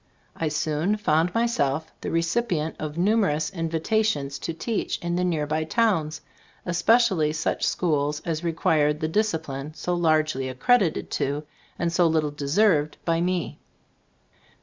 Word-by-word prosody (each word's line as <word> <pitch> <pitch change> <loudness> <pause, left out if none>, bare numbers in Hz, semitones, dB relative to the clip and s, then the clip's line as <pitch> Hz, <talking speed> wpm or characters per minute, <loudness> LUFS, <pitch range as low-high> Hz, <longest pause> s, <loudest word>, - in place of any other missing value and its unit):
I 165 - -2
soon 155 +6 0
found 165 -3 +2
myself 160 - 0
the - - -3
recipient 165 -1 0
of 155 0 -5
numerous 185 -6 +1
invitations 165 -3 -1
to - - -3
teach 205 +7 -2
in 175 0 -3
the 180 - 0
nearby 155 -3 0
towns, 160 -5 0 0.4
especially 175 -2 +3
such 155 - -2
schools 150 -3 0
as 165 -1 -2
required 155 -3 +1
the 155 - -1
"discipline" 155 -7 -2
so 180 +3 -2
largely 155 -6 +1
accredited 180 - +1
to, 145 +2 -1 0.3
and 170 -1 -1
so 175 0 +4
little 155 -2 +1
deserved, 150 +2 +2
by 165 0 +1
me. 180 -2 -2
160 Hz, 130 wpm, -25 LUFS, 150-180 Hz, 0.4 s, so